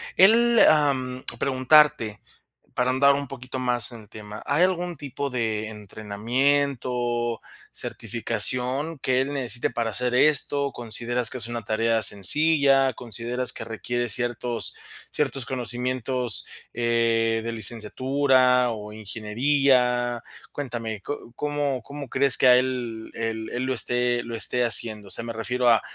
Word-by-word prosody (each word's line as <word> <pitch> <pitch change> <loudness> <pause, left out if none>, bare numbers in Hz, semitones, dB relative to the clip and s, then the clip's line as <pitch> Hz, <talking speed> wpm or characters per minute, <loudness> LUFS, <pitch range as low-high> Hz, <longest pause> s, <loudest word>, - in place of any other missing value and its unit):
Él 230 +4 +5
am 130 -4 0
Preguntarte, 130 -5 +2 0.5
para 125 0 0
ahondar 140 +2 +4
un 140 -2 -5
poquito 130 -1 -8
más 125 -2 -2
en 115 - -10
el 105 - -19
tema. 105 0 -10
¿Hay 145 +5 +2
algún 180 -2 -1
tipo 140 0 -5
de 110 -4 -3
entrenamiento, 120 +3 -2 0.3
certificación 125 +6 -1
que 130 0 +1
él 140 +2 -3
necesite 120 -4 -2
para 115 -1 -3
hacer 125 +3 -2
esto? 140 0 +2
¿Consideras 120 0 -2
que 130 - -5
es 115 - +2
una 120 -1 -5
tarea 115 +2 0
sencilla? 135 - +5
¿Consideras 120 +1 -4
que - - -7
requiere 120 +2 -4
ciertos 120 0 -2 0.3
ciertos 135 -3 -2
conocimientos, 125 -1 0 0.3
eh, 115 -1 0
de 115 - -3
licenciatura 125 +3 +1
o 105 -1 -8
ingeniería? 120 +3 0 0.3
Cuéntame, 115 -6 -5
¿có 145 -3 -8
cómo 145 -2 -3
cómo 140 0 -9
crees 135 0 +5
que - - +3
a 125 - +7
él 125 -3 -3
él 110 -1 -4
él 125 - -3
lo 130 0 -1
esté 125 0 +1
lo 115 - -7
esté 120 +2 +4
haciendo? 110 -2 +4
O - - -12
sea, 105 - -4
me 115 - -6
refiero 125 +2 -1
a, 115 -2 +4
125 Hz, 140 wpm, -24 LUFS, 115-135 Hz, 0.5 s, a